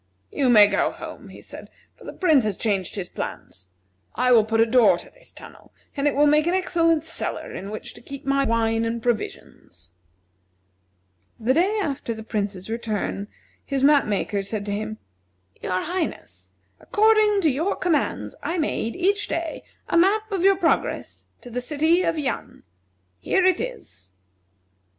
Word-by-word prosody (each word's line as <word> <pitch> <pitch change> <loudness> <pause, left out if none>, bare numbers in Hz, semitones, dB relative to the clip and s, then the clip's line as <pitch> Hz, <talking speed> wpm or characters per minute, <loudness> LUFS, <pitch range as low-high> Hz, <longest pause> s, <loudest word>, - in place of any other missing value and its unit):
"You 270 -3 +1
may 215 -4 +8
go 200 0 +1
home," - - -9
he - - -13
said, - - -11 0.3
"for - - -16
the - - -6
Prince 315 - +3
has 210 -3 -2
changed 195 -5 -1
his 190 -4 -4
plans. 95 - -8 0.5
I 250 +1 +2
will 230 -3 +7
put 225 +1 -1
a 225 - +6
door 235 0 +5
to - - -10
this - - -14
tunnel, - - -14 0.2
and 285 0 0
it 290 - +1
will 290 +1 +4
make 300 +2 +3
an 350 - +2
excellent 330 -4 +1
cellar - - -4
in 195 - -6
which 215 - -7
to - - -13
keep 275 +3 -9
my 275 0 +2
wine 225 -2 +1
and 230 +1 -2
provisions." 90 - -5 1.5
The 235 +3 +2
day 375 +8 +2
after 280 - -3
the 220 - -8
Prince's 200 -4 -3
return 220 -3 -3 0.4
his 275 -2 -2
map 290 0 +5
maker 205 0 -1
said 200 +1 -4
to 205 - -3
him: 215 +1 -4 0.6
"Your 185 0 -1
Highness, 350 +1 -5 0.3
according 430 -1 +3
to 315 -5 +3
your 320 +9 -1
commands 340 -4 -1
I 345 - -2
made, 300 -7 -1
each 400 +3 +1
day, 330 -1 -3 0.3
a - - +1
map 425 +4 +2
of 380 -3 -1
your 390 0 +6
progress 350 -3 -1
to 245 - -11
the 250 +2 -3
city 315 +6 +2
of 335 -3 0
Yan. 290 -4 -4 0.6
Here 370 - +1
it 370 -2 +3
is." 455 - -8
275 Hz, 170 wpm, -23 LUFS, 215-340 Hz, 1.5 s, may